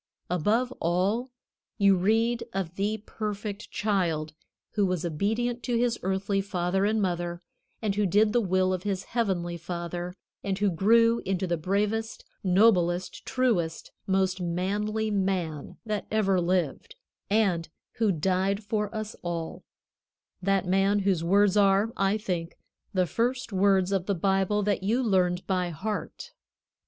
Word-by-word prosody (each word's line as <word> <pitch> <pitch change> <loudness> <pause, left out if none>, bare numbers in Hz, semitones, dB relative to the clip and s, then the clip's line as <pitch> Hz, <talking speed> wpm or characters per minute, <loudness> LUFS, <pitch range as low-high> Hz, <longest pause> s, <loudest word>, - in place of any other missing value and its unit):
Above 220 +9 +1
all, 195 +9 0 0.5
you 200 -2 +5
read 225 +5 +2
of 190 -4 -3
the 205 +2 -1
perfect 210 -1 -5
Child 170 -7 -1 0.4
who 210 - +1
was 180 -3 0
obedient 225 +9 -1
to 240 -1 -1
his 235 -1 +1
earthly 195 +1 0
father 190 0 0
and 215 +1 +1
mother, 175 -2 -2 0.4
and 210 -2 +1
who 205 0 +1
did 210 +4 +3
the 240 - +3
will 185 -2 +1
of 185 - -2
his 195 -1 -2
Heavenly 185 -7 -1
Father, 175 +1 -5 0.3
and 195 -1 -1
who 205 -1 +2
grew 230 +6 +4
into 190 0 -1
the 175 -1 0
bravest, 210 +6 -1 0.2
noblest, 180 -2 +2
truest, 190 -11 0 0.2
most 190 -1 +1
manly 205 +5 -1
man 185 -7 -2
that 215 -2 -3
ever 195 -4 +2
lived, 180 - -1 0.3
and 195 -6 +1 0.3
who 220 -3 +3
died 190 +4 0
for 210 0 -1
us 215 0 -4
all 170 -2 -4 0.8
that 195 0 +1
Man 195 +2 +2
whose 190 -4 +1
words 200 +3 +4
are, 200 +2 +3
I 195 +2 +1
think, 175 -5 -4 0.3
the 185 -3 +2
first 240 +4 -1
words 190 -1 +3
of 190 -2 0
the 200 - +1
Bible 195 +3 +1
that 205 -1 0
you 225 +7 +1
learned 185 -4 +1
by 180 -2 0
heart. 200 +6 -5
195 Hz, 145 wpm, -27 LUFS, 180-215 Hz, 0.8 s, you